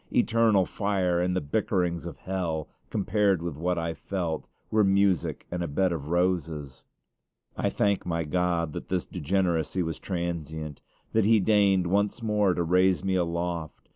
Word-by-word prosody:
Eternal 110 -4 +3
fire 95 -4 0
and 90 +1 0
the 95 - +1
bickerings 90 - -1
of - - -8
hell, 85 -5 -3 0.2
compared 100 -2 +1
with 85 -4 -3
what 90 +4 -1
I 85 0 -1
felt, 85 -3 -3 0.2
were 110 -1 +4
music 95 -5 +2
and 90 0 -2
a 85 - -1
bed 90 +6 +1
of 75 -4 -4
roses. 80 -5 -1 0.7
I - - 0
thank 100 -1 +1
my 85 -1 -1
God 85 -1 0
that - - -7
this 90 -2 0
degeneracy 90 0 0
was 80 -1 -4
transient 80 -4 -4 0.3
that 110 -2 +3
He 110 +1 +5
deigned 100 -2 +3
once 100 +5 0
more 105 -4 +2
to 85 - 0
raise 90 0 +3
me 95 - 0
aloft. 85 -2 -2
90 Hz, 160 wpm, -27 LUFS, 85-95 Hz, 0.7 s, He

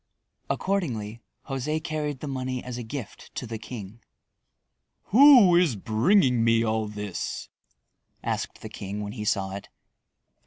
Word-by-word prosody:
Accordingly, 120 - -2 0.3
José 150 +4 -2
carried 150 -4 -3
the 150 - -4
money 130 -2 -3
as 125 -1 -6
a - - -5
gift 115 0 -8
to - - -4
the 110 -1 -6
king. 110 -2 -8 1.1
"Who 250 -8 +8
is 170 -8 +4
bringing 120 - +3
me 115 0 +4
all 110 -1 0
this?" 105 -2 -5 0.7
asked - - -3
the - - -7
king 100 +2 -6
when 100 - -5
he 105 -3 -5
saw 95 -2 0
it. 100 +1 -7
120 Hz, 140 wpm, -26 LUFS, 110-150 Hz, 1.1 s, Who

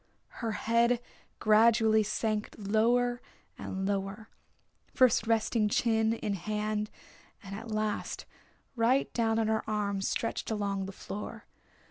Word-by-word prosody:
Her 225 -2 -1
head 235 +3 +2 0.4
gradually 220 0 +5
sank 215 0 -2
lower 240 +4 +2 0.3
and 190 0 -4
lower, 200 +2 -3 0.7
first 245 -4 +4
resting 225 -1 +2
chin 225 0 +2
in 215 -2 -2
hand 210 +3 -2 0.5
and 195 0 -7
at 225 +3 -8
last 215 -1 -2 0.5
right 245 +3 +2
down 225 -1 +1
on 225 -1 +1
her 220 0 +1
arm 200 -2 -1
stretched 230 +3 -2
along 200 -3 -1
the - - -6
floor. 200 +1 -7
215 Hz, 120 wpm, -30 LUFS, 210-230 Hz, 0.7 s, gradually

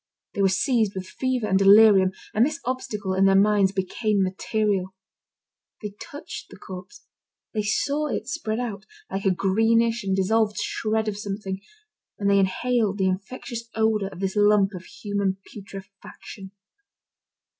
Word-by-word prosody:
They 200 - -2
were 195 - +4
seized 220 +1 +1
with 190 0 -4
fever 255 +3 -2
and 190 -2 +2
delirium, 195 -1 +7 0.2
and 220 - +4
this 305 +4 0
obstacle, 210 -6 -3
in 190 +1 +3
their 195 0 +5
minds, 200 -1 +4
became 200 +1 0
material. 190 0 -1 0.9
They 210 -1 -5
touched 290 - -8
the - - -13
corpse, 185 -2 -10 0.5
they 215 - 0
saw 285 +8 0
it - - -3
spread 220 -4 -3
out, 215 -4 -5 0.2
like 195 +1 -3
a - - +5
greenish 225 +5 +2
and 190 -1 0
dissolved 210 +2 +1
shred 220 0 -1
of 205 -1 -3
something, 195 -2 -5 0.6
and 200 - -1
they 200 - +5
inhaled 210 +2 +1
the 190 -1 +2
infectious 230 +4 -5
odour 220 -2 +1
of 190 - -11
this 190 0 -2
lump 205 -1 +4
of 180 0 -8
human 200 -2 -2 0.2
putrefaction. 195 0 -11
205 Hz, 150 wpm, -24 LUFS, 195-220 Hz, 0.9 s, delirium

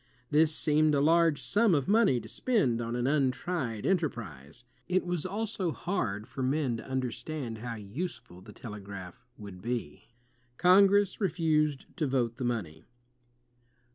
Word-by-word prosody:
This 155 +1 +4
seemed 150 0 +3
a - - +2
large 165 0 +4
sum 210 -4 +2
of 140 -3 0
money 205 - +4
to 110 - -10
spend 130 - +1
on 115 +1 -3
an 120 0 -1
untried 135 - -1
enterprise. 115 - -3 0.2
It 185 0 +1
was 175 -1 -2
also 200 -3 -2
hard 110 - -3
for 135 - -7
men 130 -2 0
to 115 - -10
understand 130 -1 -4
how 120 0 -5
useful 115 - -7
the - - -12
telegraph 100 -2 -9
would 100 -4 -10
be. 120 0 -4 0.5
Congress 195 +3 +4
refused 155 -5 +1
to 155 - 0
vote 120 -3 0
the 130 - -4
money. 90 -10 -3
135 Hz, 140 wpm, -29 LUFS, 115-170 Hz, 0.5 s, This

